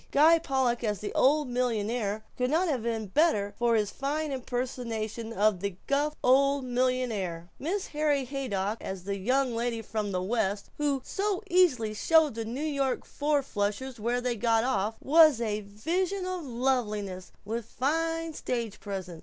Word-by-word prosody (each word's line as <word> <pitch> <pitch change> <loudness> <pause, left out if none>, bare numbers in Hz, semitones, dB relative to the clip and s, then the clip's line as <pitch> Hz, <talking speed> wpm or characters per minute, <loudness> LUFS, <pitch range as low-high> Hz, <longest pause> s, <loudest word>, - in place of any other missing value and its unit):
Guy 320 +4 +6
Pollock 265 -6 0
as 210 -2 0
the 205 - -5
old 295 +2 +3
millionaire 225 -3 -1
could 250 0 0
not 335 +5 +2
have 270 -7 0
been 225 -1 -2
bettered 205 - +2
for 235 -1 +3
his 210 -2 +1
fine 295 +2 -2
impersonation 240 -3 -3
of 210 -3 +2
the 200 -1 -3
gruff 290 +2 +1
old 275 +1 +4
millionaire; 240 -9 -1
Mrs. 370 +7 -2
Harry 295 -3 +1
Haydock 230 -6 -2
as 190 -2 -5
the 200 +1 -2
young 255 +4 +1
lady 230 -1 -2
from 215 -1 -3
the 185 - 0
West 205 -1 -1
who 280 -3 0
so 400 0 -1
easily 270 -13 +3
showed 315 +5 +4
the 225 0 -4
New 240 +5 -4
York 275 -3 -1
four 290 -1 0
flushers 230 +3 -3
where 240 +3 0
they 245 -1 -1
got 225 0 +2
off 220 -3 0
was 310 -3 +6
a 215 -2 -1
vision 350 - -2
of 365 -3 -4
loveliness 215 -7 -1
and 215 - -4
with 230 -1 -2
fine 325 +4 -1
stage 235 -7 -3
presence. 190 -4 -6
245 Hz, 165 wpm, -28 LUFS, 215-285 Hz, -, Guy